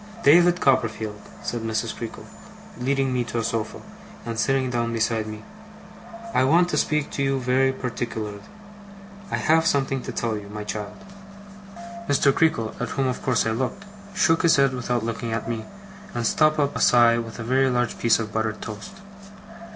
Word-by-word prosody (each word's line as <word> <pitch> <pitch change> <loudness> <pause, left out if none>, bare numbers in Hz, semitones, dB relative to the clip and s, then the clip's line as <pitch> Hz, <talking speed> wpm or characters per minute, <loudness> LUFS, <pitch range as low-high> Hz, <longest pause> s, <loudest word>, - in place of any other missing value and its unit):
'David 175 +4 +6
Copperfield,' 110 -5 0 0.2
said 120 - -3
Mrs. 110 0 -2
Creakle, 115 -2 -7 0.5
leading 135 +1 0
me 125 -1 +1
to 120 - -4
a 115 - 0
sofa, 110 -1 -3 0.4
and 115 -1 -4
sitting 130 +1 +1
down 120 -1 -1
beside 115 -1 0
me. 110 0 -8 0.9
'I - - +3
want 170 +6 +4
to - - 0
speak 150 -1 0
to - - -3
you 135 -1 +1
very 130 +1 +2
particularly. 110 -5 -4 0.9
I - - -1
have 160 +1 +3
something 135 -3 +1
to - - -6
tell 115 -2 -2
you, 100 -1 -9
my 105 0 -6
child.' 105 - -6 1.0
Mr. 140 -1 +4
Creakle, 125 -10 +1
at 125 - -2
whom 135 - +2
of 125 -1 -2
course 125 -4 +1
I 115 - +1
looked, 130 - -3 0.3
shook 165 -5 +3
his 170 -2 +5
head 135 -1 +3
without 125 -2 -2
looking 115 0 -3
at 115 0 -3
me, 115 -1 -3 0.5
and 120 -1 -1
stopped 155 +6 +3
up 145 -1 0
a - - -2
sigh 120 -1 +5
with 115 -1 -6
a 115 - -5
very 130 +3 +2
large 120 -1 -1
piece 115 -1 +4
of 110 -2 -5
buttered 110 -1 -1
toast. 105 -3 -8
120 Hz, 180 wpm, -24 LUFS, 115-135 Hz, 1.0 s, David